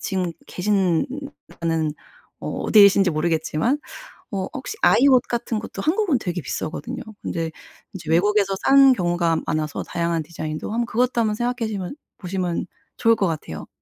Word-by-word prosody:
지금 185 -4 -2
계신느 185 -3 +1 0.6
는 160 -2 0 0.5
어 - - -5
어디 215 - +5
계신지 195 -2 +6
모르겠지만 160 - 0 0.5
어 190 -2 -2
혹시 410 - -5
아이 275 - +5
옷 255 -2 +6
같은 235 -2 -2
것도 195 -2 -7
한국은 335 - +2
되게 175 -4 -3
비싸거든요. 155 +2 -4 0.2
근데 165 -1 -3 0.4
이제 165 -5 -8
외국에서 195 +2 +3
싼 275 0 +7
경우가 175 -4 +1
많아서 155 -1 -2
다양한 170 -2 -1
디자인도 155 +2 -5
한번 235 +1 0
그것도 240 +1 +1
한번 215 -1 +1
생각해시면 225 -4 -2 0.2
보시면 180 -2 -2 0.3
좋을 230 0 +4
것 200 -4 +1
같아요. 150 - -5
190 Hz, 345 characters per minute, -22 LUFS, 165-230 Hz, 0.6 s, 싼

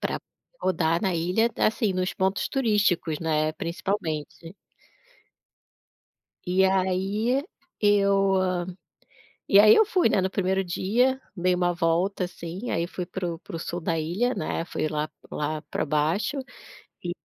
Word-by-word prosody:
para - - -2
poder - - -64 0.3
rodar 165 -2 +1
na 190 -4 +1
ilha, 180 +8 +1
assim, 215 -2 +2
nos 185 0 -1
pontos 190 +1 0
turísticos, 205 - +1
né, 155 -1 +1
principalmente. 165 0 -4 1.9
E 185 +2 +3
aí 195 +7 +1 0.4
eu 200 -2 +3 1.1
e 195 - +7
aí 215 +1 +8
eu 440 - +6
fui, 370 - +2
né, 200 - +2
no 190 - 0
1º 190 0 0
dia, 235 +9 +1 0.2
dei 180 -1 +1
uma 175 0 +1
volta, 175 +3 0
assim, 180 +4 -6
aí 170 +1 0
fui 180 0 -5
para 175 -1 -4
o 165 - -9
para 165 - -9
o - - -4
sul 175 +1 -4
da 165 0 -1
ilha, 195 +11 0
né, 160 - -2
fui 155 - -2
lá 150 0 -2 0.2
lá 150 +1 -2
para 150 - -3
baixo 155 - 0 0.7
e 175 0 -3
185 Hz, 145 wpm, -26 LUFS, 165-200 Hz, 1.9 s, aí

